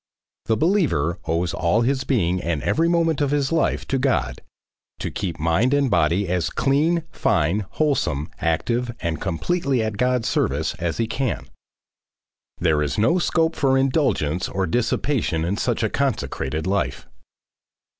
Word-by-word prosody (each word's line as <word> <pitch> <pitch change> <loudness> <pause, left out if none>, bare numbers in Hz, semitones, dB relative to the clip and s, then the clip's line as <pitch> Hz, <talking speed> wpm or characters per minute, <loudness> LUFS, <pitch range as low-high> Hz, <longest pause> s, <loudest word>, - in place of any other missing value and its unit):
The 110 - +2
believer 155 - +1
owes 85 +1 0
all 85 +7 +1
his 130 +2 0
being 90 -8 +1
and 85 -4 -2
every 165 +2 +2
moment 165 -3 +1
of 145 - +2
his 140 -1 0
life 165 - 0
to 135 - +1
God, 65 - 0 0.6
to - - -4
keep 85 -5 -4
mind 95 - +2
and 140 -4 +1
body 85 +3 +2
as 90 -2 0
clean, 155 +5 +1
fine, 90 +7 +1
wholesome, 85 - 0
active 120 +9 -1
and 85 -1 -2
completely 130 - 0
at 110 -2 -3
God's 125 0 +1
service 75 +4 0
as 85 -2 -2
he 115 - +1
can. 120 +2 -2 1.1
There 80 -3 +2
is 75 -1 -1
no 165 - +3
scope 165 -1 +1
for 135 -1 +2
indulgence 130 - +1
or 95 -1 -1
dissipation 115 - 0
in 95 +4 -1
such 120 -1 -1
a 110 - +1
consecrated 80 - -2
life. 95 -9 -1
110 Hz, 150 wpm, -22 LUFS, 85-135 Hz, 1.1 s, no